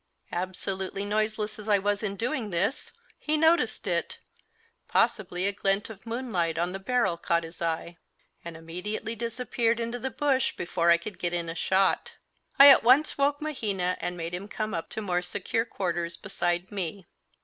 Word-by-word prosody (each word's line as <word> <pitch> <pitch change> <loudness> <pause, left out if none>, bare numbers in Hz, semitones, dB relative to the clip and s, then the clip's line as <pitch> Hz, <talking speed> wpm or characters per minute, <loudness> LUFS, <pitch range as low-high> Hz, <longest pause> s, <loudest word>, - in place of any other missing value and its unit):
Absolutely 190 +2 -3
noiseless 215 0 -1
as 210 +1 -7
I 205 - +6
was 205 +1 0
in 200 -2 -2
doing 235 +1 -2
this, 200 +10 -1 0.3
he 310 0 0
noticed 320 +2 +3
it - - -1 0.7
possibly 180 -2 +1
a 200 - +2
glint 195 +1 0
of 215 +1 -13
moonlight 220 -9 -1
on 175 +2 0
the 195 - -5
barrel 205 -4 +1
caught 170 0 +1
his 165 +1 -10
eye 170 +1 -2 0.5
and 170 -1 -7
immediately 180 +7 -5
disappeared 235 0 -1
into 235 +1 -3
the 265 - -2
bush 265 +1 +1
before 170 0 0
I 170 - +7
could 180 +2 -8
get 175 -1 -1
in 170 -1 -1
a - - -3
shot. 190 +3 +1 0.4
I 280 +1 +11
at 275 - +8
once 260 +6 +5
woke 285 +1 +2
Mahina 200 -11 -1
and 180 0 -2
made 165 0 -4
him 185 +3 -4
come 215 0 -3
up 165 - -3
to 220 - -5
more 180 -3 0
secure 225 +5 -2
quarters 175 -6 -3
beside 175 +1 -2
me. 195 -1 -3
200 Hz, 175 wpm, -28 LUFS, 175-230 Hz, 0.7 s, I